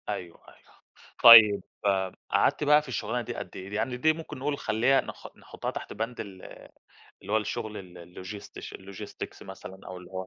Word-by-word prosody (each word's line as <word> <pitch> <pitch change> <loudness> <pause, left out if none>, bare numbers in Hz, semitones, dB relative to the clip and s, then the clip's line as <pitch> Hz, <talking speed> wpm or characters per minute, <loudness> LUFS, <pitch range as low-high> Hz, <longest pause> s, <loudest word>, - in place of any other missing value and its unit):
أيوه، 85 -2 -5
أيوه - - -23 0.4
طيب 110 -3 +10 0.7
قعدتِ - - +2
بقى 150 +1 +5
في 150 - -14
الشغلانة 120 -1 -2
دي 115 - -6
قد - - -7
إيه؟ 95 +1 -8
دي 105 - -6
يعني 125 +3 -1
دي 155 +5 +3
ممكن 160 -3 -8
نقول 140 +2 -2
خليها 120 +3 +2
نح - - -9
نحطها - - -6
تحت - - -7
بند 115 +2 -4
ال-اللي 95 -2 -11 0.5
هو - - +4
الشغل 110 0 -3
ال 90 -2 -10
logistics 90 +4 -9
logistics 95 0 -9
مثلًا 95 0 -10
أو 95 - -7
اللي 90 -1 -12
هو، 95 0 -5
105 Hz, 175 wpm, -28 LUFS, 95-125 Hz, 0.7 s, طيب